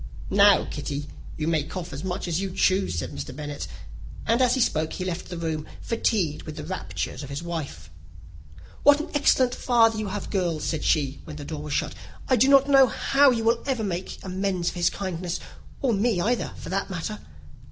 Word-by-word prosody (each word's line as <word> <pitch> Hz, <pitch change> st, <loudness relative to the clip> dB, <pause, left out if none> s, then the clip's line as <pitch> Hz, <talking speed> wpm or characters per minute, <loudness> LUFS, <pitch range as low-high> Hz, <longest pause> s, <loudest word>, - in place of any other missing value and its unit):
"Now, 200 Hz, 0 st, +6 dB
Kitty, 145 Hz, 0 st, -5 dB, 0.3 s
you 155 Hz, -1 st, -2 dB
may 160 Hz, -2 st, +2 dB
cough 165 Hz, +3 st, -6 dB
as 140 Hz, -, -6 dB
much 185 Hz, 0 st, -3 dB
as 170 Hz, +1 st, 0 dB
you 195 Hz, -, -2 dB
choose," 190 Hz, -, +2 dB
said 80 Hz, -, -3 dB
Mr. -, -, -6 dB
Bennet; 145 Hz, -1 st, -5 dB, 0.6 s
and, 230 Hz, +3 st, +2 dB
as 250 Hz, 0 st, +4 dB
he -, -, -1 dB
spoke, 160 Hz, -9 st, +1 dB
he 185 Hz, -, -4 dB
left 180 Hz, -1 st, -4 dB
the 175 Hz, -, -5 dB
room, 160 Hz, -2 st, -3 dB
fatigued 200 Hz, -9 st, 0 dB
with 155 Hz, -, -8 dB
the -, -, -6 dB
raptures 90 Hz, -, -4 dB
of 140 Hz, -, -8 dB
his 140 Hz, +4 st, -5 dB
wife. 160 Hz, -, -5 dB, 0.9 s
"What 290 Hz, 0 st, +6 dB
an 315 Hz, -, -5 dB
excellent 260 Hz, -3 st, +3 dB
father 225 Hz, -4 st, +3 dB
you 215 Hz, -, -2 dB
have, 205 Hz, +1 st, -5 dB
girls," 175 Hz, -6 st, 0 dB
said 160 Hz, -2 st, -2 dB
she, 140 Hz, -3 st, +1 dB
when 155 Hz, -, -8 dB
the 145 Hz, -1 st, -7 dB
door 155 Hz, -1 st, -5 dB
was 150 Hz, -1 st, -5 dB
shut. -, -, 0 dB, 0.3 s
"I 260 Hz, -, +4 dB
do 250 Hz, +3 st, +4 dB
not 275 Hz, 0 st, +6 dB
know 270 Hz, -2 st, +7 dB
how 275 Hz, +4 st, +4 dB
you 235 Hz, -3 st, +1 dB
will 230 Hz, +1 st, +2 dB
ever 255 Hz, -5 st, 0 dB
make 185 Hz, -2 st, -4 dB
him 190 Hz, -, -6 dB
amends 185 Hz, -2 st, 0 dB
for -, -, -9 dB
his 175 Hz, 0 st, +3 dB
kindness; 180 Hz, -2 st, -4 dB, 0.4 s
or 255 Hz, -4 st, +3 dB
me 210 Hz, -1 st, +1 dB
either, 235 Hz, +7 st, 0 dB
for -, -, -8 dB
that 195 Hz, +2 st, -1 dB
matter. 190 Hz, +4 st, -4 dB
185 Hz, 210 wpm, -25 LUFS, 155-225 Hz, 0.9 s, know